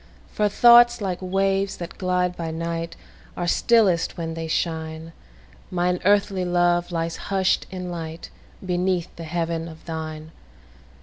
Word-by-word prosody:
For 210 -1 +1
thoughts, 240 +2 +7
like 190 -3 -3
waves 195 +1 0
that 170 -1 -8
glide 180 -1 0
by 165 -2 -4
night, 165 +1 -4 0.4
Are 175 - -1
stillest 190 -2 +3
when 165 -1 -3
they 165 0 -5
shine; 160 0 -3 0.6
Mine 180 0 0
earthly 200 -1 +2
love 175 0 +1
lies 165 -1 -2
hush'd 190 -1 +1
in 180 -1 -6
lightBeneath 175 +2 -4
the 165 - -8
heaven 165 0 -2
of 160 -1 -12
thine. 160 -1 -6
175 Hz, 130 wpm, -23 LUFS, 165-190 Hz, 0.6 s, thoughts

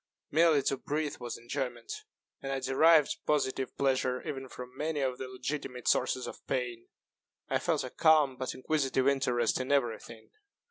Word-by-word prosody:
Merely 160 -3 +4
to 135 - 0
breathe 150 +2 -2
was 120 -2 -5
enjoyment; 120 -1 -4 0.5
and 135 - -4
I 135 - -1
derived 155 +3 +4
positive 130 -3 0
pleasure 130 0 0
even 135 -3 -5
from 125 +1 -9
many 150 +2 -2
of 130 -2 -1
the 130 - -4
legitimate 130 -1 -5
sources 130 - +2
of - - -9
pain. 120 -2 -2 0.6
I - - +1
felt - - 0
a - - -6
calm 155 -4 +4
but 130 0 -4
inquisitive 135 -1 0
interest 125 -5 +2
in 130 +2 -3
every 125 -5 +2
thing. 115 -1 -13
130 Hz, 160 wpm, -31 LUFS, 125-145 Hz, 0.6 s, Merely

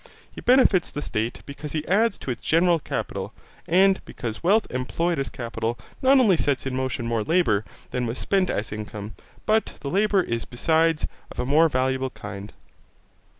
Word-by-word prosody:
He - - -9
benefits 245 -8 +4
the 145 - -5
state 110 +2 -3
because 145 +1 -7
he 155 -1 -3
adds 215 +2 +2
to 130 - -4
its 120 - -5
general 170 +1 +3
capital, - - -4 0.3
and 190 +3 +4
because 115 -2 -6
wealth 205 +6 +3
employed 150 +6 -1
as 135 - -2
capital 115 -2 -3 0.2
not 270 +1 +6
only 205 -9 +4
sets 140 -4 0
in 130 -1 -2
motion 130 -2 -2
more 115 -1 0
labour 140 - +2 0.3
than 125 -1 -1
when 115 - -3
spent 190 +5 +1
as 105 - -2
income, 105 0 -6 0.3
but 220 +1 +1
the 140 - -4
labour 200 -1 +3
is 115 -5 -2
besides 160 +5 +1 0.3
of - - -11
a 125 - -1
more 155 +5 +4
valuable 130 0 0
kind. 105 -3 -8
140 Hz, 175 wpm, -24 LUFS, 120-180 Hz, 0.3 s, not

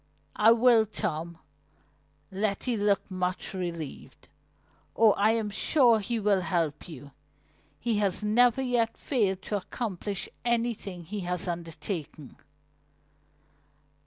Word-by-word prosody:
"I 215 +2 +6
will, 230 -1 +5
Tom," 170 -5 -4 0.9
Letty 205 +5 -1
looked 205 -1 0
much 185 0 -3
relieved. 170 -6 -6 0.7
"Oh, 220 -1 +6
I 210 +2 +3
am 220 -2 -1
sure 235 +2 +4
he 230 +3 -2
will 200 -2 +2
help 170 -3 -2
you! 145 -3 -10 0.7
He 225 -3 0
has 200 0 0
never 245 +4 +3
yet 240 -3 0
failed 195 -8 0
to 210 - -2
accomplish 200 -1 -4 0.2
anything 230 -6 -1
he 205 +6 -5
has 180 -1 -3
undertaken!" 165 -3 -5
205 Hz, 110 wpm, -28 LUFS, 180-225 Hz, 0.9 s, I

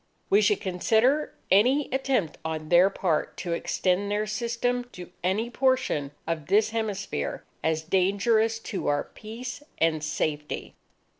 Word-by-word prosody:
_ - - +5
_We 415 - +6
should 420 - +3
consider 220 +10 +2 0.2
any 255 +9 +4
attempt 265 - 0
on 155 -1 -4
their 180 +2 +6
part 175 -5 -1
to 175 -2 -3
extend 185 +3 0
their 210 +1 0
system 235 +3 -1
to 180 -1 -9
any 210 +6 0
portion 255 - +1 0.2
of 160 -3 -3
this 210 +4 +3
hemisphere, 200 - -3 0.2
as 160 0 0
dangerous 200 +6 +2 0.2
to 195 - -2
our 145 0 +2
peace 240 +5 -8 0.2
and 160 -2 +1
safety. 150 0 -3
200 Hz, 140 wpm, -27 LUFS, 165-235 Hz, 0.2 s, We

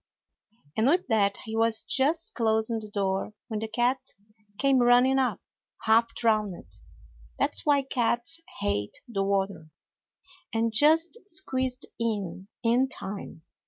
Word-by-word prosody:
And 220 +3 +2
with 350 +6 +3
that 205 -3 +2
he 220 0 -5
was 225 0 +1
just 305 +5 +1
closing 220 0 0
the 215 -1 -9
door 195 +1 -2
when 215 -2 -3
the 220 - -4
cat 240 +4 +1 0.6
came 275 -1 +3
running 245 +2 +4
up, 260 - 0 0.4
half 230 +1 +3
drowned 215 -5 +1 0.8
that's - - 0
why 285 -2 +4
cats 255 +4 0 0.2
hate 100 0 -2
the 215 -5 -2
water 195 -4 -1 0.8
and 225 0 0
just 320 - +5
squeezed 260 -8 +1
in, 200 -5 -3 0.2
in 245 +3 +2
time. 195 -8 -6
230 Hz, 125 wpm, -27 LUFS, 210-265 Hz, 0.8 s, just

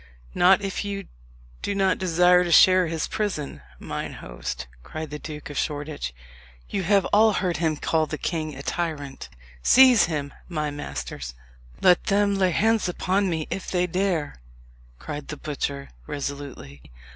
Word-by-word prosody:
"Not 190 +3 +5
if 195 0 -2
you 200 -1 -4 0.6
do 200 - -2
not 190 -1 +2
desire 180 0 +4
to 175 - -2
share 185 +1 +7
his 160 -1 -2
prison, 190 -10 -3 0.2
mine - - -5
host," - - -6 0.2
cried 155 - -7
the 150 - -5
Duke 150 -1 -7
of 145 - -2
Shoreditch. 145 - -3 0.6
"You 195 - -2
have 195 +2 +3
all 215 +1 +6
heard 180 -4 0
him 160 -1 0
call 160 +1 +1
the 155 - -4
king 155 -3 -3
a 140 - -8
tyrant. 145 -6 -4 0.3
Seize 255 - +7
him, 145 -4 -3 0.2
my 150 -3 -2
masters!" 65 - -6 0.5
"Let 180 -1 +5
them 200 0 +2
lay 190 -2 +2
hands 215 +2 +2
upon 190 +2 0
me 160 -3 -2
if 195 - -4
they 180 -1 +1
dare!" 180 - -1 0.6
cried 150 - -7
the 150 - -6
butcher 140 -1 -4 0.2
resolutely. 140 - -6
165 Hz, 155 wpm, -25 LUFS, 145-190 Hz, 0.6 s, share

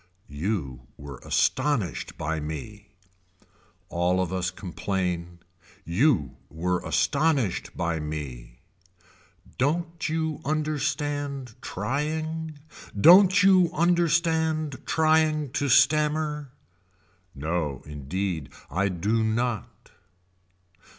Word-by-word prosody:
You 70 - -3
were 70 -2 -9
astonished 125 - 0
by 80 +1 -2
me. 90 +8 -7 1.0
All 90 +2 +1
of 95 -1 -1
us 90 -1 0
complain. 90 -2 -3 0.5
You 85 - +2
were 90 +3 -1
astonished 140 - 0
by 85 -1 -1
me. 65 -6 -6 1.0
Don't 165 +4 -1
you 160 -2 -2
understand 145 -3 -2
trying. 155 +4 -3 0.4
Don't 190 - +7
you 185 -3 +6
understand 160 -3 +1
trying 155 -3 +2
to 140 +1 -1
stammer. 150 +2 +3 0.9
No 75 -2 -2
indeed 80 +3 -4 0.2
I 100 +4 +1
do 105 +6 0
not. 110 -1 -2
120 Hz, 85 wpm, -26 LUFS, -, 1.0 s, Don't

